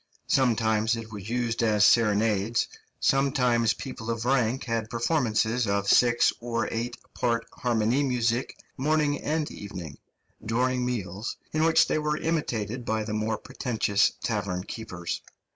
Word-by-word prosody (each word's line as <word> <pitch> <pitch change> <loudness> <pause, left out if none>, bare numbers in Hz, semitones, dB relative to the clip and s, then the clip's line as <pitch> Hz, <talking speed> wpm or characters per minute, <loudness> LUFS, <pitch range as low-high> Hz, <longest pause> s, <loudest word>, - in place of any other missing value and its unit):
Sometimes 110 -3 +2
it 115 -1 -7
was 105 -1 -7
used 120 -1 -1
as 105 -3 +4
serenades, 110 0 +3 0.3
sometimes 125 -4 +2
people 120 -4 -7
of 115 0 -2
rank 125 -1 +1
had 115 -2 -2
performances 115 -2 +1
of 100 0 0
six 120 +3 +4
or 115 -1 -2
eight 120 +2 -3 0.2
part 115 -1 0
harmoniemusik 120 +1 +1 0.3
morning 150 +1 +1
and 155 0 -1
evening, 90 -7 -8 0.4
during 125 +3 0
meals, 110 -3 -3 0.2
in 155 0 +2
which 165 - +5
they - - +1
were 150 0 0
imitated 125 -8 -2
by 110 -1 -1
the 105 0 -4
more 110 0 -1
pretentious 110 -5 0
tavern 100 -5 -2
keepers. 90 -6 -5
115 Hz, 130 wpm, -27 LUFS, 110-125 Hz, 0.4 s, which